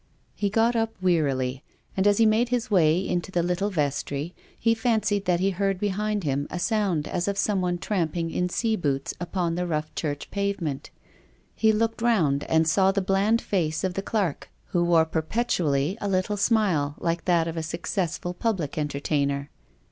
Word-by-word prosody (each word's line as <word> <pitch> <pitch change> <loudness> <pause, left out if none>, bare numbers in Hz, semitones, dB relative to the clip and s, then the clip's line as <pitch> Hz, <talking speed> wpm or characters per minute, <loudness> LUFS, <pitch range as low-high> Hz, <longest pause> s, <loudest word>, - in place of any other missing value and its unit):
He 205 - -1
got 225 +3 +2
up 225 -1 0
wearily, 140 -7 0 0.3
and 190 +1 +2
as 205 -1 +4
he 230 - +5
made 220 +3 +3
his 245 -1 -1
way 175 -1 +3
into 175 +2 -2
the 175 -2 +1
little 180 +4 0
vestry, 145 -1 -2 0.3
he 230 - +3
fancied 220 -4 0
that 180 -1 +2
he 195 +2 +2
heard 195 0 -1
behind 205 0 -1
him 140 -1 -1
a - - -4
sound 190 -5 0
as 180 +1 -2
of 200 0 -1
someone 185 -4 +1
tramp 175 -3 -1
ing 165 -1 -1
in 180 +2 0
scaboots 175 - -1
upon 175 -1 -1
the 180 +1 -2
rough 155 -1 -2
church 145 -3 -4
pavement. 200 -8 -2 0.6
He 220 -1 +3
looked 225 +1 0
round 165 -13 +2
and 160 0 +2
saw 190 +4 +4
the 200 - 0
bland 195 +4 +2
face 160 -4 -1
of 185 -1 0
the 195 - -2
clerk, 200 -7 -2 0.2
who 175 -1 +1
wore 170 -2 +4
perpetually 160 - 0
a 205 - -1
little 185 +2 0
smile, 195 -10 +1
like 165 -1 -2
that 170 -2 +3
of 165 - -4
a 165 - -2
successful 175 +2 -3
public 180 - -2
entertainer. 140 -1 -1
180 Hz, 180 wpm, -25 LUFS, 160-205 Hz, 0.6 s, he